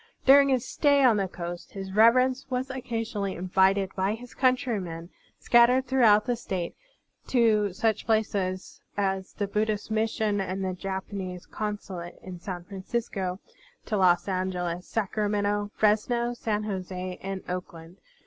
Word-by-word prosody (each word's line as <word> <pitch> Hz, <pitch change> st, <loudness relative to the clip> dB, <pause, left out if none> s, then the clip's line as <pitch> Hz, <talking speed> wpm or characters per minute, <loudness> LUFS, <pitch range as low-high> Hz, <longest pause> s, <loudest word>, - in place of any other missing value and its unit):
During 275 Hz, +1 st, +7 dB
his 255 Hz, -1 st, +1 dB
stay 285 Hz, -2 st, +3 dB
on 240 Hz, -5 st, +5 dB
the 195 Hz, -1 st, 0 dB
coast. 175 Hz, -1 st, -7 dB
His 195 Hz, -1 st, -6 dB
Reverence 255 Hz, +5 st, +4 dB
was 260 Hz, +1 st, -2 dB
occasionally 225 Hz, -6 st, -3 dB
invited 190 Hz, +2 st, +2 dB
by 195 Hz, +2 st, 0 dB
his 245 Hz, +2 st, -12 dB
cotmtrymen, 215 Hz, -11 st, 0 dB, 0.3 s
scat 240 Hz, 0 st, +5 dB
tered 260 Hz, +1 st, +2 dB
throughout 230 Hz, -5 st, +4 dB
the 245 Hz, -2 st, 0 dB
State, 185 Hz, -6 st, -4 dB, 0.5 s
to 220 Hz, -5 st, +3 dB
such 220 Hz, +3 st, -1 dB
places 200 Hz, -4 st, -1 dB, 0.2 s
as 195 Hz, -1 st, -1 dB
the 205 Hz, -, -2 dB
Buddhist 210 Hz, +1 st, -1 dB
Mission 215 Hz, -2 st, 0 dB
and 190 Hz, 0 st, -3 dB
the 185 Hz, -, -1 dB
Japanese 190 Hz, -1 st, -5 dB
Con 210 Hz, -1 st, -3 dB
sulate 175 Hz, -4 st, -9 dB
in 185 Hz, -2 st, -8 dB
San 180 Hz, -1 st, -6 dB
Francisco, 195 Hz, -1 st, -4 dB, 0.5 s
to 215 Hz, -, -2 dB
Los 180 Hz, -2 st, +3 dB
Angeles, 180 Hz, -2 st, -2 dB
Sacra 210 Hz, -1 st, -1 dB
mento, 205 Hz, 0 st, 0 dB
Fresno, 235 Hz, +3 st, +2 dB
San 215 Hz, -3 st, -2 dB
Jose, 185 Hz, -2 st, -5 dB
and 195 Hz, 0 st, -5 dB
Oakland. 180 Hz, -1 st, -7 dB
205 Hz, 145 wpm, -27 LUFS, 185-230 Hz, 0.5 s, During